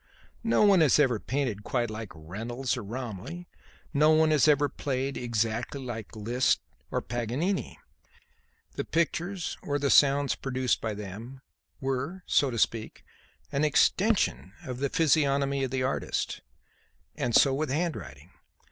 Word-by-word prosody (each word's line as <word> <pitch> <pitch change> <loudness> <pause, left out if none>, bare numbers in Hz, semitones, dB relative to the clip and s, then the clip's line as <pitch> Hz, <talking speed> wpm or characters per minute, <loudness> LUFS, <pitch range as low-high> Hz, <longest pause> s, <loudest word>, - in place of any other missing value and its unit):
No 225 -1 +3
one 200 -4 +6
has 150 -5 +5
ever 130 -7 +3
painted 125 -6 -2
quite 120 -1 -1
like 110 -1 -6
Reynolds 115 +11 -4
or 125 - -5
Romney; 125 - -6 0.5
no 150 +1 +4
one 155 0 +4
has 155 0 +4
ever 145 -1 +4
played 135 0 -3
exactly 115 +2 -2
like 120 -4 -7
Liszt 120 +4 +1 0.3
or - - -1
Paganini; 125 - -2 1.0
the - - -3
pictures 170 +2 -1
or 145 -1 -1
the 140 -1 +1
sounds 140 0 +5
produced 130 -2 -1
by 110 -2 -2
them, 105 +6 -8 0.4
were, 135 +8 -3
so 140 - +3
to 120 - -4
speak, 110 0 -1 0.5
an 140 - 0
extension 180 - +2
of 125 -1 -5
the 140 0 0
physiognomy 140 -4 +2
of 130 - -1
the 130 0 -1
artist. 130 - -2 0.7
And 120 -1 -1
so 135 - +6
with 150 +2 -1
handwriting. 90 - -3
135 Hz, 140 wpm, -28 LUFS, 115-150 Hz, 1.0 s, one